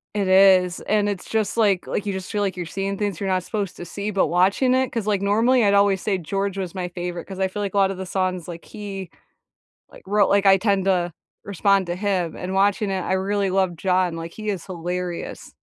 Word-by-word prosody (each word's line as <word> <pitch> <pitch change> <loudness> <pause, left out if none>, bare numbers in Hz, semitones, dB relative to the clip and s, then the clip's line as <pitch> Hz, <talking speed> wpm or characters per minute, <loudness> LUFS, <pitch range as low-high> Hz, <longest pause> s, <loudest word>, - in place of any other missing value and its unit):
It 200 -2 0
is, 185 -2 +5
and, 210 -1 +1
it's 195 -3 -5
just, 220 0 -1
like 200 -5 +2
like, 205 - -3
you 200 - -2
just 190 +2 -6
feel 205 -1 -1
like 190 -2 -1
you're 175 - -3
seeing 195 +3 -3
things 205 -5 -2
you're 195 -1 -2
not 185 -1 +1
supposed 205 -5 -3
to 175 - -7
see, 200 +4 -4
but 195 -5 +2
watching 195 - +3
it. 260 -1 +1
'Cause, 225 -3 -3
like, 200 -2 +1
normally 230 +5 +3
I'd 200 -1 +3
always 200 -2 +3
say 200 -3 0
George 195 +3 -3
was 185 -2 -4
my 180 -2 -3
favorite, 175 0 -5
'cause 190 -1 -8
I 190 - +2
feel 205 +2 -5
like 200 -1 -3
a - - -1
lot 195 -1 +4
of 195 - -6
the 190 - -5
songs, 185 -2 -2
like 170 -1 -8
he, 195 -4 -7 0.8
like, - - -15
wrote 205 0 +3
like, 200 0 +3
I 195 0 +7
tend 195 -1 +1
to 180 -3 +1 0.3
respond 200 -1 +1
to 175 - -2
him 185 -4 -1
and 185 +1 -5
watching 200 +1 +2
it, 190 -1 -1
I 185 - -1
really 195 +1 0
love 185 -2 +1
John, 180 -1 +1
like, 165 0 -6
he 215 -1 -5
is 190 -5 -3
hilarious. 180 -1 -5
195 Hz, 240 wpm, -23 LUFS, 180-200 Hz, 0.8 s, I